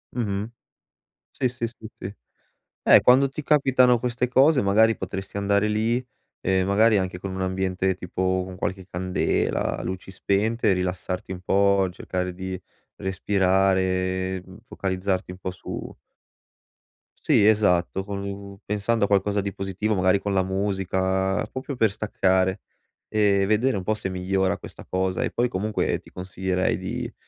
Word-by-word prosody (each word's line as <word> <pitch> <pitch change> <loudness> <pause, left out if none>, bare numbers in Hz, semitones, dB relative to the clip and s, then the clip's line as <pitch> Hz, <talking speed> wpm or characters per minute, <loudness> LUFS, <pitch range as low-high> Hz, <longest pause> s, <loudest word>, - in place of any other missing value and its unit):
Mh-mh. 105 -2 -2 0.8
Sì, 130 - -1
sì, 120 -1 -3
sì, 115 -1 -10
sì. 100 +2 -6 0.7
Eh, - - +7
quando 135 +2 +5
ti 150 +3 -6
capitano 130 -4 +4
queste 125 +1 -1
cose, 135 +3 +4
magari, 110 +3 +4
potresti 95 +1 -6
andare 100 +1 +2
lì, 115 +4 0 0.4
ehm, 95 0 +1
magari 105 +2 +4
anche 95 -1 -3
con 95 0 -5
un 95 - -4
ambiente 95 0 0
tipo 95 +1 -1
con 95 0 -9
qualche 95 0 -4
candela, 90 0 -1
luci 95 +1 -5
spente 105 +3 0
e - - +5
rilassarti 90 0 -3
un 90 - -7
po', 100 +1 +3
cercare 90 0 -4
di 95 0 -5 0.4
respirare, 95 -1 +1
mhmm, 95 +2 -14
focalizzarti 95 -3 -2
un 90 - -11
po' 95 - -4
su 90 - -7 1.3
Sì, 100 - +4
esatto, 95 -3 +2
con 100 0 -5
u 100 0 -7
pensando 105 +1 +1
a - - -2
qualcosa 100 0 +2
di 100 0 -3
positivo, 95 +2 -2
magari 95 +1 +3
con 100 0 -2
la 95 -1 +2
musica, 95 0 0
proprio 130 +1 -6
per 110 -4 +3
staccare 95 -3 +1 0.5
e 100 -2 +2
vedere 110 +3 +2
un 95 - -4
po' 110 - +1
se 100 -3 -4
migliora 95 +1 0
questa - - -11
cosa. 95 0 -1
E - - -2
poi, 120 - +1
comunque, 105 0 -1
ti - - -18
consiglierei 95 0 -1
di - - -5
95 Hz, 150 wpm, -24 LUFS, 95-105 Hz, 1.3 s, Eh